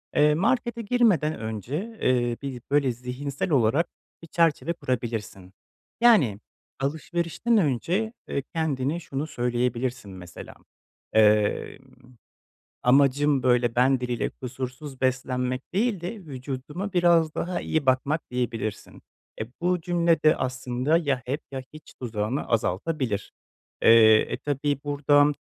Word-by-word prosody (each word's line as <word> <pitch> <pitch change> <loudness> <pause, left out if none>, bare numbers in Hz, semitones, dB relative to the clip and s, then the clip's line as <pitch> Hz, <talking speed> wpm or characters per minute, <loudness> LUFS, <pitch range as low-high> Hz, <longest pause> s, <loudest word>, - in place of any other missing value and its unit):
Eee, 150 0 +5
markete 235 +5 0
girmeden 205 - +2
önce, 130 - -5
eee, 120 -2 +1
bir 135 -3 -5
böyle 140 -3 +3
zihinsel 125 +6 -4
olarak 140 +5 +3 0.3
bir 165 - -11
çerçeve 165 0 +1
kurabilirsin. 110 - -4 0.5
Yani 165 - +5 0.4
alışverişten 170 +10 -1
önce, 180 - 0
eee, 140 - -2
kendine 155 -1 -1
şunu 145 -2 -4
söyleyebilirsin, 125 -3 -2
mesela, 90 -2 -10 0.6
eee, 105 -1 +3 1.0
"Amacım, 140 +2 +3
böyle, 120 -2 +2
ben 130 +1 +3
diliyle 125 -1 -2
kusursuz 130 +2 -7
beslenmek 130 0 -1
değil 210 -1 +1
de, 175 +6 -4
vücuduma 145 - -6
biraz 170 -3 +3
daha 180 +1 -2
iyi 155 -3 -1
bakmak.", 140 +4 +1
diyebilirsin. 120 -4 -4 0.4
Eee, 110 - -2
bu 180 0 +1
cümle 170 -1 +1
de 155 +1 +5
aslında 130 +3 0
ya 140 -6 -1
hep 140 +5 -3
ya 130 -1 -4
hiç 155 -1 -14
tuzağını 115 +1 -2
azaltabilir. 110 - -1 0.5
Eee, 110 -1 +7
e, - - 0
tabii 145 0 -1
burada, 145 0 +3
135 Hz, 120 wpm, -25 LUFS, 125-165 Hz, 1.0 s, Eee